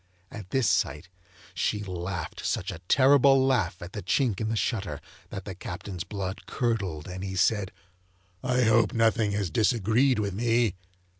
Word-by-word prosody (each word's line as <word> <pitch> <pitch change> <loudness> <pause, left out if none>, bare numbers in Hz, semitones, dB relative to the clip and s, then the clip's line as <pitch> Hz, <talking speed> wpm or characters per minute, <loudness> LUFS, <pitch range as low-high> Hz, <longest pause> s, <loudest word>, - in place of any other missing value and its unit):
At 105 -4 -9
this 130 -5 +1
sight 75 +6 0 0.4
she 105 -1 -1
laughed 90 -2 -5
such - - -1
a - - -8
terrible 135 +2 +5
laugh 95 -9 0
at 90 - -9
the 105 - -4
chink 110 +2 0
in 110 - -1
the 115 - -1
shutter, 100 - -2 0.3
that 100 - -7
the 95 - -5
Captain's 90 0 -6
blood 95 -2 -5
curdled, 100 - -2
and 90 +1 -6
he 95 -1 -4
said: 100 0 +1 0.7
'I 125 0 +2
hope 110 -1 +3
nothing 115 -2 +2
has 100 -4 -1
disagreed 115 +3 +2
with 100 -2 -1
me! 115 0 +1
105 Hz, 160 wpm, -27 LUFS, 95-115 Hz, 0.7 s, terrible